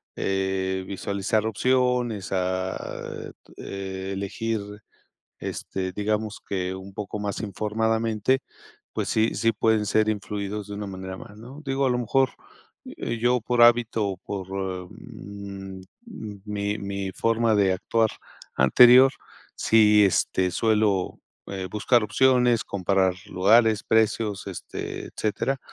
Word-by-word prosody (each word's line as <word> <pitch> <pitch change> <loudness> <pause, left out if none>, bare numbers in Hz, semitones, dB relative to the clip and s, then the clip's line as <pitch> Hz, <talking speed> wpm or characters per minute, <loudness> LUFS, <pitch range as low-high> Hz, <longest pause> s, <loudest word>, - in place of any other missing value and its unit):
eh, 95 -1 -1
visualizar 100 +2 -1
opciones, 125 -2 +1
a 95 0 -3 0.3
elegir 100 +3 -4 0.8
este, 95 -1 -4
digamos 105 +1 -2
que 95 -1 -2
un 95 +1 -10
poco 105 0 -5
más 105 -1 -3
informadamente, 110 +4 0 0.5
pues - - -2
sí 110 +1 +2
sí 115 0 +2
pueden 110 0 +2
ser 110 +1 +2
influidos 105 -1 -3
de 105 - -6
una 105 0 -5
manera 95 0 -6
más 105 -2 -12
¿no? 130 +7 -11
Digo 135 0 0
a - - +2
lo 125 - +1
mejor, 130 +3 +2 0.6
eh, 120 - -4
yo 120 +2 +2
por 120 +1 0
hábito 120 -2 +4
o 95 - -3
por, 95 0 -6 0.4
mm, 100 -1 -9 0.6
mi 105 0 -2
mi 100 -1 -4
forma 115 +1 +2
de 100 -2 +3
actuar 110 +4 +1 0.4
anterior, 125 - +7 0.4
si 105 -2 +5
este, 95 -1 +1
suelo 105 -2 +1 0.3
eh, 95 -1 -4
buscar 115 +3 +2
opciones, 125 -1 +3
comparar 95 -1 +1
lugares, 110 +3 +4
precios, 110 -2 +1
este, 95 - -6
etcétera, 130 +5 -1
105 Hz, 120 wpm, -25 LUFS, 95-115 Hz, 0.8 s, anterior